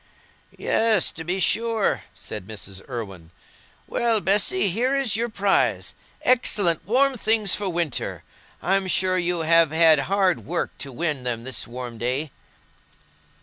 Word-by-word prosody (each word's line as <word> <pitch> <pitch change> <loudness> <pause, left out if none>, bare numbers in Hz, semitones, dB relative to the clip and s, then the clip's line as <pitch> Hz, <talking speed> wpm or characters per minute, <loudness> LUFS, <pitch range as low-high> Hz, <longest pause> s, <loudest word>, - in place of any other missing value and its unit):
"Yes, 220 -5 +2
to 160 - -7
be 180 +4 -2
sure," 225 +3 +1
said 95 - -7
Mrs. 95 -3 -8
Irwine. 100 -9 -7 0.6
"Well, 230 -2 +1
Bessy, 205 - +2
here 250 +8 0
is 270 -7 0
your 235 +2 -1
prize—excellent 200 -2 0
warm 260 +3 +2
things 215 -3 +2
for 205 -2 0
winter. 170 -5 -3 0.4
I'm 195 +1 +1
sure 185 0 +2
you 175 -1 0
have 165 -1 +4
had 160 -1 +5
hard 195 -2 +1
work 175 0 -3
to 140 - -5
win 150 0 -2
them 120 -2 -3
this 130 -2 -3
warm 120 -1 -7
day." 130 +5 -2
180 Hz, 135 wpm, -23 LUFS, 135-215 Hz, 0.6 s, had